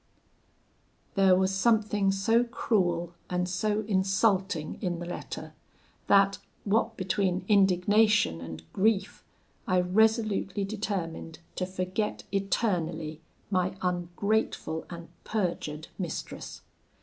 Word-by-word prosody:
"There 195 -2 +5
was 190 +1 +2
something 210 -1 +2
so 225 +5 +3
cruel 175 -8 0 0.2
and 180 0 0
so 205 +4 0
insulting 195 -4 +1
in 180 -4 -1
the 175 - -6
letter, 175 - -6 0.5
that, 195 0 +4 0.2
what 225 +2 +1
between 185 -1 0
indignation 200 - +4
and 80 -1 -8
grief, 200 0 +1 0.4
I 185 -1 +3
resolutely 210 +1 +2
determined 195 -6 -4 0.2
to 185 - -2
forget 185 +3 -2
eternally 170 -6 -1 0.3
my 185 0 0
ungrateful 180 -1 -1
and 170 -1 -8
perjured 170 -7 -3
mistress. 175 -4 -5
190 Hz, 100 wpm, -28 LUFS, 175-210 Hz, 0.5 s, There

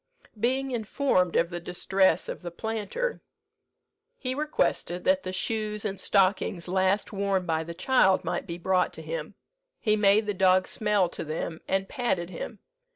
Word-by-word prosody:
Being 260 +4 +1
informed 220 -5 +1
of 170 +1 +2
the 175 - -3
distress 180 +1 +1
of - - -5
the 175 - -5
planter, 225 - -3 1.0
he 255 - -2
requested 265 - -1
that 280 0 +3
the 185 - -5
shoes 210 +2 -2
and 195 -2 -2
stockings 190 -3 +1
last 190 +3 +1
worn 195 -2 0
by 160 -1 0
the 170 +1 -8
child 190 -1 +3
might - - -3
be 170 -1 -5
brought 185 +1 +1
to - - -9
him. - - -5 0.4
He 215 -1 +2
made 210 +1 +4
the 210 - -1
dog 185 -1 +4
smell 210 -4 +1
to - - -5
them, 160 +1 -4
and 195 0 0
patted 190 -10 -1
him. 205 +5 -6
195 Hz, 160 wpm, -27 LUFS, 180-220 Hz, 1.0 s, made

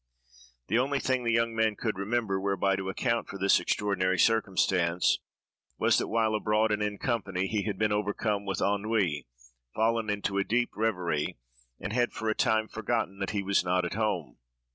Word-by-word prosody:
The 115 - +1
only 140 +2 +1
thing 130 -2 0
the 115 - +1
young 115 0 +2
man 110 -1 +2
could 110 -2 -2
remember, 100 -1 0
whereby 100 0 +1
to 95 0 -4
account 115 +4 -1
for 100 - -6
this 95 +1 +4
extraordinary 95 -2 0
circumstance, 90 -4 +2 0.6
was, - - +3
that - - -2
while 110 -1 +1
abroad, 110 0 +1
and 105 0 0
in 105 -1 -1
company, 100 -7 -1
he 105 +1 -1
had 105 -3 -2
been 110 +1 +1
overcome 105 0 -1
with 95 -2 -3
ennui, 100 - 0 0.5
fallen 115 0 +1
into 100 -1 -1
a - - +2
deep 120 +4 0
reverie, 90 - -1 0.4
and 100 - -4
had 120 0 +1
for 110 0 -2
a 110 - +1
time 110 0 +2
forgotten 110 -3 -2
that 100 - -2
he 100 -2 -2
was 100 -1 +2
not 90 0 +1
at 85 - -3
home. 95 - -2
105 Hz, 185 wpm, -29 LUFS, 95-110 Hz, 0.6 s, this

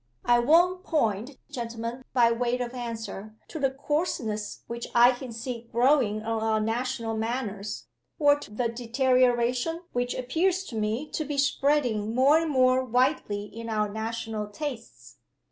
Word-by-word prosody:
I 240 0 +5
won't 350 +8 +4
point, 245 - -1
gentlemen, 235 -1 -5
by 235 -2 +4
way 240 +1 0
of 245 -1 -4
answer, 225 -4 -6
to 315 - -6
the 270 -2 +2
coarseness 265 -7 -2
which 235 0 -5
I 240 +1 +8
can 250 0 -7
see 235 +1 -6
growing 235 -3 +3
on 225 0 -1
our 220 0 +1
national 230 +1 -2
manners, 220 -3 -3 0.3
or 290 -1 +4
to - - -10
the 235 +3 -1
deterioration 250 +5 +1
which 245 0 -1
appears 345 +9 0
to 230 - -7
me 220 +7 -1
to 310 - -2
be 290 -1 -4
spreading 275 -6 +1
more 275 +5 +5
and 325 -1 -2
more 255 -2 +3
widely 250 -4 +1
in 230 +2 -8
our 215 -1 +1
national 220 0 -4
tastes. 235 +1 -7
240 Hz, 150 wpm, -27 LUFS, 225-265 Hz, 0.3 s, I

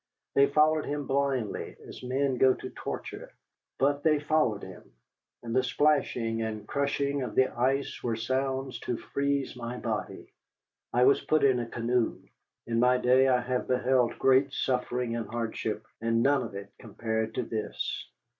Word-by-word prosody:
They 140 0 +5
followed 155 +1 +3
him 145 0 -2
blindly, 135 -5 -1
as - - -10
men 130 +1 0
go 130 +1 +5
to - - -8
torture, - - -6 0.5
but 140 +2 +2
they 155 -1 +3
followed 145 -9 +1
him, 95 -8 -11 0.5
and 115 0 -4
the 130 - +5
splashing 125 -4 +1
and 110 -2 -4
crushing 140 0 0
of 125 - -4
the 130 0 +4
ice 135 +3 0
were 115 -2 -1
sounds 130 +2 -2
to 120 - -3
freeze 140 +1 -1
my 120 0 -5
body. 110 -5 -4 0.6
I 125 +1 +3
was 140 +2 +5
put 155 -2 +1
in 130 -3 +4
a 120 -1 -4
canoe. 120 0 0 0.5
In 115 0 0
my 125 +1 +4
day 130 +2 +4
I 125 -2 +3
have 125 0 -2
beheld 125 -1 +2
great 135 +1 +4
suffering 125 -3 -1
and 115 -1 -3
hardship, 110 -2 -3 0.2
and 115 0 +2
none 140 -1 +3
of 115 -5 -6
it 100 0 -7
compared 110 0 -3
to 125 - 0
this. 110 - -4
125 Hz, 165 wpm, -29 LUFS, 115-140 Hz, 0.6 s, They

